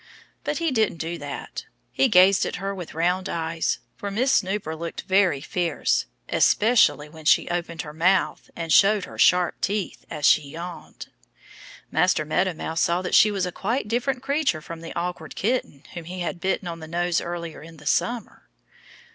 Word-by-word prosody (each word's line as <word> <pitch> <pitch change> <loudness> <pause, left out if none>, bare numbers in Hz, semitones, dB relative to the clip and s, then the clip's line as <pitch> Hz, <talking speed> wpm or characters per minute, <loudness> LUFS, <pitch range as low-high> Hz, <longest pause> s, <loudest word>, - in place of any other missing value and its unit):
But - - -2
he 335 -2 0
didn't 220 -8 +1
do 165 +1 -4
that. 145 -1 -7 0.3
He 270 - +3
gazed 190 -2 +6
at - - -4
her 195 +1 -3
with 180 -5 -8
round 180 +3 0
eyes, 165 0 -1 0.2
for 200 - -5
Miss 245 +7 +1
Snooper 190 -6 0
looked 170 +1 -6
very 190 -7 +2
fierce, 170 +2 0 0.2
especially 215 -9 +3
when 160 0 -14
she - - +4
opened 170 -2 -3
her 150 - -9
mouth 170 -1 +1
and 165 -2 -1
showed 200 -1 +5
her - - -12
sharp 180 -1 +3
teeth 200 -1 -2
as 150 - -3
she - - +6
yawned. 165 +5 -9 0.8
Master 180 -4 +2
Meadow 180 +3 0
Mouse 160 +1 -3
saw 175 +2 +1
that 180 - -4
she 215 - +7
was 195 -3 -1
a 180 - -3
quite 225 +6 -2
different 245 +3 -1
creature 280 - +1
from 165 +1 -9
the 165 - -8
awkward 170 -2 -4
kitten 210 - -2
whom 175 -3 -7
he 180 +2 -6
had 175 0 -3
bitten 190 -1 -1
on 165 -1 -5
the 160 - -9
nose 175 +1 0
earlier 170 -2 -6
in 165 +1 -12
the 150 - -15
summer. 235 - -1
175 Hz, 180 wpm, -24 LUFS, 165-200 Hz, 0.8 s, she